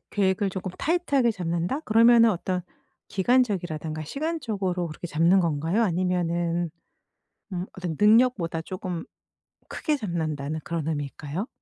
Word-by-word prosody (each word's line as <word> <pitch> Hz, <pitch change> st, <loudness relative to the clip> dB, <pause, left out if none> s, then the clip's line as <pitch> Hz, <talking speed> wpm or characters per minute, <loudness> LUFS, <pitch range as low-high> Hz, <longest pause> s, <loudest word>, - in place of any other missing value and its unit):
"계획을 195 Hz, 0 st, +1 dB
조끔 185 Hz, 0 st, -4 dB
타이트하게 285 Hz, -7 st, +2 dB
잡는다." 175 Hz, -, -2 dB
그러면은 230 Hz, -2 st, +6 dB
어떤 180 Hz, -1 st, -2 dB, 0.5 s
기간적이라든가 180 Hz, -9 st, 0 dB
시간적으로 215 Hz, -, -2 dB
그렇게 160 Hz, +3 st, -7 dB
잡는 170 Hz, +4 st, +4 dB
건가요? 165 Hz, +6 st, +1 dB
아니면은 175 Hz, -2 st, 0 dB, 0.8 s
음 180 Hz, 0 st, -3 dB
어떤 175 Hz, -4 st, -4 dB
'능력보다 210 Hz, -7 st, +4 dB
조금 185 Hz, 0 st, -5 dB, 0.6 s
크게 305 Hz, -2 st, -1 dB
잡는다.'는 155 Hz, -, -3 dB
그런 165 Hz, -2 st, -3 dB
의미일까요? 150 Hz, -, -3 dB
180 Hz, 335 characters per minute, -26 LUFS, 165-220 Hz, 0.8 s, 그러면은